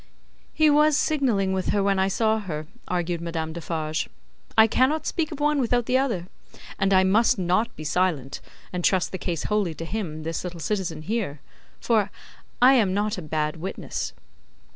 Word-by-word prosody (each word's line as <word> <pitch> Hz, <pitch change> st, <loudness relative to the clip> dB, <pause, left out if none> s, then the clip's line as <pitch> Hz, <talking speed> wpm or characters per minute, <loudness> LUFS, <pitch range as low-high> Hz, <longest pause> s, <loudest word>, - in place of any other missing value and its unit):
"He 310 Hz, -, +3 dB
was 300 Hz, 0 st, +4 dB
signalling 235 Hz, -11 st, +1 dB
with 190 Hz, -1 st, -1 dB
her 200 Hz, -, +2 dB
when 195 Hz, -1 st, +2 dB
I 190 Hz, -, +3 dB
saw 220 Hz, +2 st, +1 dB
her," 155 Hz, -7 st, -5 dB, 0.2 s
argued 175 Hz, -1 st, -1 dB
Madame 165 Hz, -1 st, -3 dB
Defarge; 160 Hz, -2 st, -3 dB, 0.5 s
"I 220 Hz, -, +9 dB
cannot 260 Hz, +7 st, +2 dB
speak 330 Hz, -1 st, -1 dB
of 300 Hz, -, -6 dB
one 295 Hz, -1 st, +2 dB
without 245 Hz, -1 st, +1 dB
the 255 Hz, +2 st, +2 dB
other; 230 Hz, -11 st, -1 dB, 0.5 s
and 195 Hz, 0 st, +2 dB
I 190 Hz, -1 st, +6 dB
must 210 Hz, +5 st, +3 dB
not 185 Hz, +5 st, 0 dB
be 155 Hz, -, -8 dB
silent, 155 Hz, -4 st, -1 dB, 0.3 s
and 180 Hz, -1 st, -2 dB
trust 185 Hz, -1 st, +2 dB
the 185 Hz, -, -5 dB
case 170 Hz, -4 st, -2 dB
wholly 205 Hz, -6 st, 0 dB
to 165 Hz, -, -6 dB
him, 165 Hz, -5 st, -4 dB
this 165 Hz, 0 st, -3 dB
little 180 Hz, -2 st, -6 dB
citizen 170 Hz, -4 st, -2 dB
here. 190 Hz, -6 st, -2 dB, 0.4 s
For, 220 Hz, -4 st, +2 dB, 0.5 s
I 260 Hz, +2 st, +8 dB
am 205 Hz, -7 st, +3 dB
not 205 Hz, -1 st, 0 dB
a -, -, -6 dB
bad 155 Hz, 0 st, -2 dB
witness." 180 Hz, +4 st, -4 dB
190 Hz, 180 wpm, -25 LUFS, 165-225 Hz, 0.5 s, I